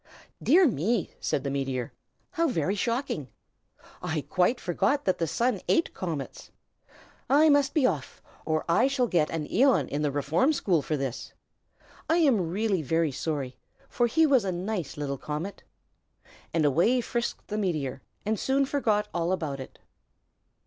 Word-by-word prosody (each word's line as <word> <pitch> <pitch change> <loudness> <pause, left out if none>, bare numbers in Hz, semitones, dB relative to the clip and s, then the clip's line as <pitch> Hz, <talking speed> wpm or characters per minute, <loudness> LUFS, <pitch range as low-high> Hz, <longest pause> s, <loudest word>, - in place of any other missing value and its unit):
"Dear 365 0 +5
me!" 220 - 0
said 135 - -1
the 140 - -2
meteor. 135 -3 -2 0.4
"How 335 0 +1
very 190 - 0
shocking! 230 - -2 0.7
I 155 -1 -2
quite 185 - +1
forgot 275 - 0
that 185 - +1
the 165 - 0
Sun 230 - 0
ate 330 - +2
comets. 160 -7 -5 0.8
I 300 +3 +6
must 285 0 +3
be 295 -5 +4
off, 155 - -2 0.2
or 155 -1 -1
I 175 +10 +4
shall 270 -2 +1
get 170 -9 +1
an 155 -2 -3
æon 240 - +3
in 145 - -2
the 150 - +1
Reform 150 - +1
School 185 - +1
for 150 +2 -2
this. 135 -3 -5 0.8
I 325 - +4
am 240 - +3
really 200 0 0
very 160 +2 +1
sorry, 135 -3 -4 0.3
for 240 - +1
he 320 +7 +3
was 270 -6 +4
a 190 - -1
nice 180 -3 -4
little 140 -2 -3
comet!" 155 +7 -5 0.9
And 160 -2 +1
away 170 - +3
frisked 235 0 -3
the 210 - -2
meteor, 150 -10 -2 0.2
and 215 -1 0
soon 275 +1 +2
forgot 220 -7 0
all 170 +1 0
about 155 -7 -2
it. 130 - -9
180 Hz, 160 wpm, -27 LUFS, 150-245 Hz, 0.9 s, I